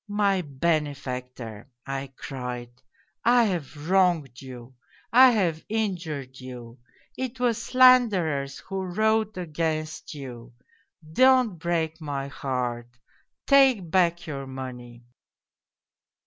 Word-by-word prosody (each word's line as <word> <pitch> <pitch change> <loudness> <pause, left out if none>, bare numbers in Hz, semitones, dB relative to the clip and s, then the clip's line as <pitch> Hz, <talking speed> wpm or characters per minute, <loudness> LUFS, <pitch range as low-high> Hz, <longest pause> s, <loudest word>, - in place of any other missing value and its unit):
' - - -65 0.2
My 195 -2 +3
benefactor! 130 -7 -3
' 120 - -54
I 135 0 -5
cried, 125 -3 -6 0.3
' 170 - -47 0.2
I've 160 - -1
wronged 175 -9 +2
you, 130 -1 -10 0.4
I 260 +2 +9
have 180 -9 0
injured 170 - -3
you; 125 -2 -10 0.4
it 260 -1 -5
was 235 -2 +1
slanderers 215 - +4
who 195 0 -3
wrote 215 +3 0
against 155 -2 -3
you; 125 -4 -9 0.6
don't 255 -5 +4
break 165 -1 -2
my 140 -2 -4
heart, 120 -3 -4 0.5
take 260 - +4
back 175 -1 +2
your 140 -3 -6
money 125 -2 -8
155 Hz, 105 wpm, -26 LUFS, 130-195 Hz, 0.6 s, I